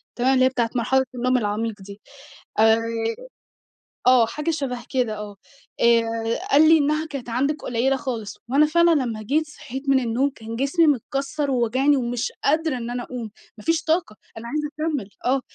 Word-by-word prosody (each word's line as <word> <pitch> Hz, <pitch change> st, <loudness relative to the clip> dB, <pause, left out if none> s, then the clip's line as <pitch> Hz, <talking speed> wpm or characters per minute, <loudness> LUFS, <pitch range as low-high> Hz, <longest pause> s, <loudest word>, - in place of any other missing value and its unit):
تمام 255 Hz, +2 st, +2 dB
اللي 260 Hz, -1 st, +4 dB
هي -, -, +4 dB
بتاعة 240 Hz, -3 st, -1 dB
مرحلة 265 Hz, +3 st, +2 dB
النوم 255 Hz, +1 st, +1 dB
العميق 215 Hz, -1 st, -2 dB
دي. 200 Hz, +2 st, -11 dB, 0.6 s
آآ 220 Hz, 0 st, +6 dB, 1.3 s
آه، 250 Hz, -2 st, +6 dB
حاجة 300 Hz, +8 st, -3 dB
شبَه 255 Hz, -6 st, -4 dB
كده 240 Hz, -5 st, -1 dB
آه. 210 Hz, -1 st, -7 dB, 0.5 s
آآ 235 Hz, -1 st, +5 dB, 0.5 s
قال 305 Hz, +3 st, +6 dB
لي 325 Hz, -, +7 dB
إنها 305 Hz, +1 st, +1 dB
كانت 275 Hz, -5 st, -7 dB
عندِك 280 Hz, +5 st, -1 dB
قليلة 255 Hz, +3 st, +1 dB
خالص. 225 Hz, -6 st, -5 dB
وأنا 285 Hz, +4 st, +5 dB
فعلًا 340 Hz, +2 st, +4 dB
لمّا 245 Hz, -8 st, 0 dB
جيت 305 Hz, +8 st, 0 dB
صحيت 280 Hz, -2 st, -7 dB
من 270 Hz, -1 st, +5 dB
النوم، 250 Hz, +3 st, 0 dB
كان 225 Hz, -4 st, -8 dB
جسمي 280 Hz, +7 st, +2 dB
متكسّر، 275 Hz, +1 st, -1 dB
وواجعني، 260 Hz, +4 st, +2 dB
ومش 245 Hz, -1 st, -2 dB
قادرة 310 Hz, -1 st, +1 dB
إن 235 Hz, -1 st, -5 dB
أنا 245 Hz, 0 st, -3 dB
اقوم. 240 Hz, -4 st, -7 dB, 0.3 s
ما 210 Hz, -, -12 dB
فيش 330 Hz, +4 st, +1 dB
طاقة، 320 Hz, -7 st, 0 dB, 0.2 s
أنا 230 Hz, +1 st, -7 dB
عايزة 300 Hz, +4 st, -2 dB
اكمّل 300 Hz, -10 st, -2 dB, 0.2 s
آه. 265 Hz, +2 st, +2 dB
255 Hz, 175 wpm, -23 LUFS, 230-290 Hz, 1.3 s, لي